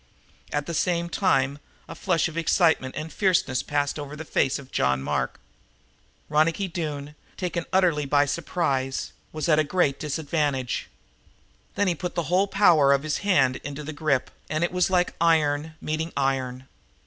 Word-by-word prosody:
At 145 -1 -1
the 170 - -5
same 170 +1 0
time 140 -7 +1 0.3
a - - -7
flush 170 -4 +1
of 165 - -9
excitement 165 -5 +2
and 155 0 -5
fierceness 175 - +2
passed 145 +1 -1
over 145 0 -6
the 160 +2 -7
face 135 - +1
of 135 -1 -12
John 65 0 +1
Mark. - - -2 0.9
Ronicky 160 +6 +2
Doone, 150 -4 -4 0.2
taken 175 -2 -3
utterly 170 -6 +2
by 145 +1 +4
surprise, 140 -3 -2 0.2
was 155 -2 -3
at 155 -2 +4
a - - +4
great 150 -3 +1
disadvantage. 145 -4 -2 0.9
Then 205 - +1
he 180 - +3
put 175 +2 -5
the 170 - 0
whole 195 +2 +4
power 175 -8 +5
of 140 +1 +1
his 155 -1 -1
own - - -11
hand 135 -10 +3
into 145 +1 -7
the 155 +2 -6
grip, 145 -3 0 0.2
and 155 +2 0
it 175 - 0
was 180 0 +1
like 180 -1 +2
iron 160 -1 +2
meeting 160 +2 -3
iron. 130 -2 -1
155 Hz, 170 wpm, -25 LUFS, 140-170 Hz, 0.9 s, power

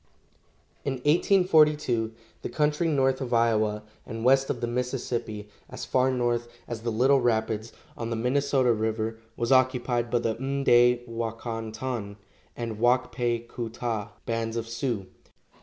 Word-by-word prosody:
In 140 - -1
1842 150 - +3 0.3
the - - -4
country 150 +2 +1
north 135 -3 +2
of 125 -2 -1
Iowa 110 -2 +2 0.2
and 115 +1 -6
west 135 +1 +4
of 120 - -1
the 120 - -1
Mississippi 120 -3 -3 0.2
as - - -6
far 130 0 +2
north 120 -2 0 0.2
as 115 -2 -5
the 115 0 -2
Little 130 +5 +4
Rapids, 110 -1 0 0.2
on 115 -1 -4
the 115 - -1
Minnesota 125 +1 +2
river, 110 0 -2 0.2
was 120 +1 -1
occupied 125 -2 +2
by 120 - +2
the 115 -1 0
M'day 125 -2 +3
wa 115 -1 -3
kon 115 -1 -5
ton 110 -3 -4 0.4
and 115 -3 -5
Wak 125 +2 +3
pe 120 -1 -1
ku 115 -1 -5
ta 115 -2 -4
bands 115 0 -2
of 115 0 -3
Sioux. 115 -3 -2
120 Hz, 150 wpm, -27 LUFS, 115-130 Hz, 0.4 s, west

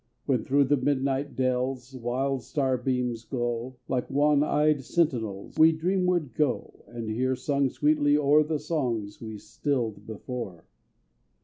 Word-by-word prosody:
When, - - +1
thro' 140 +1 +3
the 145 +2 +2
midnight 135 +1 0
dells, 130 0 -1
Wild 130 +2 -1
star 130 +1 0
beams 125 -2 -1
glow, 120 0 -3
Like 125 -2 -1
wan 145 +1 +3
eyed 150 -1 +2
sentinels, 120 - -1
We 160 +1 +8
dreamward 175 -4 0
go, 145 0 -1
And 115 -2 -6
hear 130 +4 0
sung 140 +1 0
sweetly 145 +1 +3
o'er 150 +1 +5
The 155 +1 0
songs 125 -10 -2
we 110 -2 -6
stilled 110 -1 -3
before. 110 -5 -6
130 Hz, 135 wpm, -27 LUFS, 120-145 Hz, -, We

